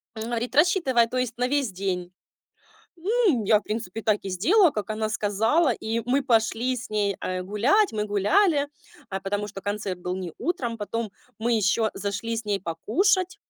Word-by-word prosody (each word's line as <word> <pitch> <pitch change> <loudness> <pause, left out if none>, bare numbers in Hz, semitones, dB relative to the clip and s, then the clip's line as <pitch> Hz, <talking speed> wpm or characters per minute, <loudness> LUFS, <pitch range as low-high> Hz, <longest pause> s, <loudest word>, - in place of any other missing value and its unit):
Говорит: 235 +3 -3
"Рассчитывай, 295 -7 +4
то 250 +2 -4
есть, 250 -2 -2
на 250 +1 +1
весь 275 -4 0
день." 180 -1 -3 0.9
Ну, 380 - +2
я, 210 0 +5
в - - -20
принципе, 220 -1 -4
так 210 -1 +2
и 195 - -4
сделала, 320 - +4
как 210 -3 -4
она 215 0 -1
сказала, 225 - +2
и 225 +1 -2
мы 260 +3 +2
пошли 235 0 +1
с 245 - -7
ней, 205 -2 0
э, 185 0 -2
гулять, 245 - +2
мы 210 -1 -1
гуляли, 285 - +2 0.4
а, 195 - -3
потому 205 +2 -2
что 195 -1 -8
концерт 200 -2 -3
был 180 +1 -3
не 185 -2 -5
утром. 250 -7 -2
Потом 220 0 -3 0.3
мы 230 +2 -1
ещё 220 +1 +2
зашли 200 +3 -3
с 225 - -5
ней 205 -1 0
покушать 365 - +1
225 Hz, 180 wpm, -25 LUFS, 205-260 Hz, 0.9 s, я